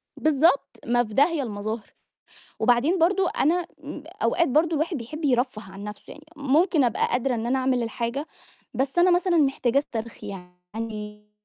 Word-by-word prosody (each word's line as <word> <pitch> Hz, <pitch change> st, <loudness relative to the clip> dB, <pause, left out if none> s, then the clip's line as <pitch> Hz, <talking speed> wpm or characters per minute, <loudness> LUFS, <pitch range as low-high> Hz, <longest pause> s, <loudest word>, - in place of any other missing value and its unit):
بالضبط، 310 Hz, 0 st, +2 dB
ما 240 Hz, +1 st, +2 dB
في 215 Hz, -2 st, -9 dB
داهية 290 Hz, +2 st, +3 dB
المظاهر، 215 Hz, 0 st, -5 dB, 0.7 s
وبعدين 270 Hz, +9 st, +3 dB
برضه 370 Hz, +2 st, +3 dB
أنا 340 Hz, +4 st, +2 dB, 0.2 s
إمم، 290 Hz, +1 st, -7 dB, 0.2 s
أوقات 340 Hz, -2 st, +3 dB
برضه 315 Hz, +5 st, +2 dB
الواحد 315 Hz, +1 st, -1 dB
بيحب 300 Hz, +7 st, -6 dB
يرفّه 245 Hz, -4 st, +1 dB
عن 195 Hz, +1 st, -9 dB
نَفْسه 210 Hz, 0 st, -9 dB
يعني، 305 Hz, 0 st, -13 dB
ممكن 295 Hz, +2 st, +2 dB
أبقى 235 Hz, -, +1 dB
قادرة 250 Hz, 0 st, 0 dB
إن 225 Hz, 0 st, -3 dB
أنا 260 Hz, +2 st, +1 dB
أعمل 255 Hz, -2 st, +1 dB
الحاجة، 235 Hz, +6 st, -3 dB, 0.5 s
بس 270 Hz, +5 st, -2 dB
أنا 360 Hz, +1 st, +5 dB
مثلًا 355 Hz, -1 st, +3 dB
محتاجة 270 Hz, -3 st, +2 dB
استرخي 225 Hz, -5 st, -6 dB
يعني. 210 Hz, +3 st, -8 dB
260 Hz, 155 wpm, -25 LUFS, 225-310 Hz, 0.7 s, أنا